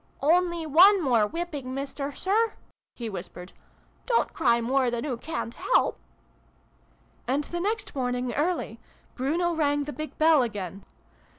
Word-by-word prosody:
" -, -, -36 dB
Only 340 Hz, +2 st, +2 dB
one 370 Hz, +7 st, +7 dB
more 235 Hz, -6 st, +3 dB
whipping, 295 Hz, -4 st, -5 dB
Mister 275 Hz, +1 st, -4 dB
Sir! 430 Hz, -, +1 dB, 0.2 s
" -, -, -67 dB
he 235 Hz, -, -5 dB
whispered. 180 Hz, -2 st, -8 dB, 0.3 s
" -, -, -36 dB
Don't 470 Hz, -2 st, +1 dB
cry 235 Hz, -2 st, +3 dB
more 255 Hz, +2 st, +1 dB
than 240 Hz, +2 st, -3 dB
oo 265 Hz, -5 st, -2 dB
ca'n't 240 Hz, -2 st, -5 dB
help! -, -, +1 dB, 0.6 s
") -, -, -36 dB
"And 275 Hz, +4 st, +1 dB
the 345 Hz, +4 st, -5 dB
next 430 Hz, +5 st, -2 dB
morning 250 Hz, -2 st, -2 dB
early, 340 Hz, +5 st, -1 dB, 0.3 s
Bruno 335 Hz, +7 st, 0 dB
rang 290 Hz, -2 st, +1 dB
the 295 Hz, +1 st, -6 dB
big 310 Hz, 0 st, -7 dB
bell 315 Hz, -2 st, +5 dB
again. 200 Hz, -5 st, -4 dB
285 Hz, 160 wpm, -26 LUFS, 245-340 Hz, 0.6 s, one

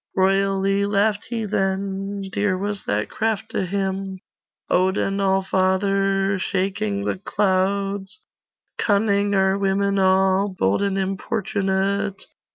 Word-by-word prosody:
Royally 195 Hz, +1 st, +2 dB
laughed 205 Hz, +1 st, +1 dB
he 230 Hz, -2 st, -3 dB
then; 195 Hz, 0 st, -2 dB
Dear 205 Hz, -2 st, +1 dB
was 205 Hz, +1 st, -4 dB
that 105 Hz, +1 st, -1 dB
craft 220 Hz, 0 st, -2 dB
to 190 Hz, -, -1 dB
him, 195 Hz, 0 st, -2 dB, 0.5 s
Odin 190 Hz, +2 st, +1 dB
Allfather, 195 Hz, 0 st, +1 dB
Shaking 200 Hz, +2 st, -1 dB
the -, -, -2 dB
clouds. 195 Hz, -, -1 dB, 0.6 s
'Cunning 200 Hz, -1 st, +2 dB
are 190 Hz, 0 st, +2 dB
women 200 Hz, 0 st, +1 dB
all, 190 Hz, +1 st, +3 dB
Bold 95 Hz, -, +1 dB
and 200 Hz, -1 st, 0 dB
importunate! 195 Hz, 0 st, -1 dB
195 Hz, 105 wpm, -22 LUFS, 190-200 Hz, 0.6 s, all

